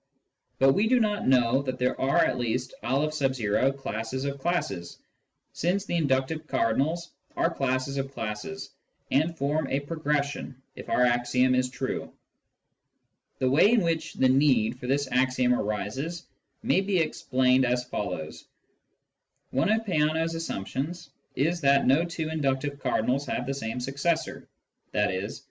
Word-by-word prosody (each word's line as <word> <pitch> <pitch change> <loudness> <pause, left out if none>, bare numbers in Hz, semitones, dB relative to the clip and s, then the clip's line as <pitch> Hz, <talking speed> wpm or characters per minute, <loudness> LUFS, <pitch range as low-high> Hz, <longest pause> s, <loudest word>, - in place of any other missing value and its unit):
But 135 0 +5
we 210 +7 +2
do 250 +2 +4
know 135 - +2
that 130 -2 -3
there 125 0 0
are 135 +1 +2
at - - -1
least 125 +2 -2
N 135 -3 +1
classes 130 +1 -4
of 140 0 -3
classes, 170 - -2 0.6
since 185 +4 0
the 175 - -2
inductive 155 0 0
cardinals 145 +7 0 0.3
are 165 - +1
classes 135 0 -1
of 135 0 -3
classes, 105 -10 -5 0.4
and 160 +5 +1
form 145 +1 0
a 135 +2 -1
progression 145 -3 -2 0.2
if - - -9
our 125 - +3
axiom 125 +1 +2
is 125 0 +1
true. 130 +1 -4 1.3
The 130 - +1
way 170 - +5
in 235 - +4
which 165 -1 -1
the 130 - +3
need 130 -4 +3
for 125 - -6
this 140 +1 +1
axiom 130 -1 +2
arises 125 - -3 0.4
may 190 - +3
be 195 -1 0
explained 130 -5 +2
as 125 0 +1
follows: 90 -10 -5 0.5
— - - -52
One 135 +8 +1
of 220 +1 +1
Peano's 160 -2 +1
assumptions 165 - -4 0.2
is 170 +6 0
that 140 -1 +4
no 140 +6 +4
two 165 -2 -4
inductive 140 -2 -1
cardinals 130 +2 0
have 125 - -2
the 135 - -2
same 125 -2 -4
successor, 140 +6 -2 0.5
i.e. 100 -1 0
135 Hz, 145 wpm, -27 LUFS, 125-160 Hz, 1.3 s, But